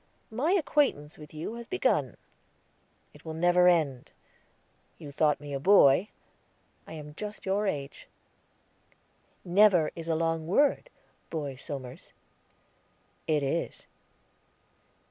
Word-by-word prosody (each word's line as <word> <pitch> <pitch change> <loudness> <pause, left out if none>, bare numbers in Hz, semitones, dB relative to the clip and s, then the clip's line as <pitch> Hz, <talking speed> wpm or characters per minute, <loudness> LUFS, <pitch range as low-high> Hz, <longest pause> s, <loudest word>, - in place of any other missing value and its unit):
My 280 +11 0
acquaintance 280 - 0
with 150 -1 -12
you 155 +7 -6
has 235 0 -9
begun; 375 - 0 1.0
it - - -17
will 160 -1 -6
never 175 +2 +4
end. 155 -8 +1 0.9
You 145 - -10
thought 150 +1 +1
me 145 -1 -8
a 135 - -2
boy; 180 +1 +5 0.8
I - - -9
am 150 -1 -9
just 210 +5 -7
your 200 +2 0
age." 140 -5 -5 1.4
"'Never,' 180 -3 +4
is 165 -1 -7
a 165 - +1
long 165 0 -1
word, 285 - +2 0.4
Boy 145 -4 -4
Somers." 130 -1 -9 1.1
"It 150 -2 +1
is." 140 +5 -3
165 Hz, 115 wpm, -28 LUFS, 150-200 Hz, 1.4 s, boy